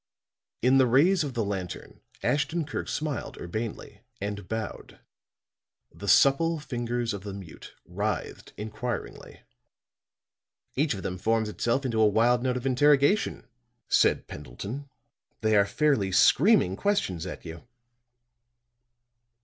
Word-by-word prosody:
In 130 +2 +5
the 130 - +5
rays 160 +9 +4
of 135 -4 -5
the 115 -3 0
lantern 95 -3 -6 0.2
Ashton 150 +6 0
Kirk 145 - -4
smiled 150 -4 -3
urbanely, 110 +6 -6 0.2
and 100 -1 -5
bowed. 110 -1 -6 0.9
The 100 - -9
supple 160 +8 +4
fingers 120 -4 -3
of 100 - -5
the 100 0 -7
mute 95 -5 -11
writhed - - -4
inquiringly. 110 +3 -6 1.3
"Each 145 -3 +1
of 95 - -7
them 90 0 -4
forms 110 +1 +1
itself 120 +5 -1
into 115 -3 0
a 110 - +6
wild 120 +4 +3
note 125 0 0
of 125 - -6
interrogation," 145 - +3 0.4
said - - +3
Pendleton. 115 - -7 0.5
"They 110 0 +2
are 100 -1 +4
fairly 115 -5 +1
screaming 145 - +4
questions 95 - -1
at 90 - -8
you." 80 0 -8
120 Hz, 125 wpm, -27 LUFS, 100-140 Hz, 1.3 s, a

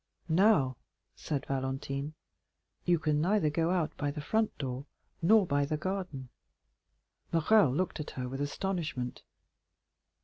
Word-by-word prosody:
"Now," 160 - +4 0.4
said 145 -3 -3
Valentine, 135 +2 -3 0.7
"you 175 -1 +4
can 150 -2 +1
neither 175 -3 +2
go 165 +2 +1
out 175 -4 0
by 145 - -1
the 145 +2 -5
front 220 +9 0
door 135 0 -4 0.3
nor 205 +4 +6
by 145 -3 +1
the 150 +2 -1
garden." 180 -7 -4 1.0
Morrel 165 -1 +5
looked 175 +6 -1
at 150 - -4
her 125 -1 -2
with 135 +2 -4
astonishment. 150 -5 -2
150 Hz, 130 wpm, -31 LUFS, 140-180 Hz, 1.0 s, nor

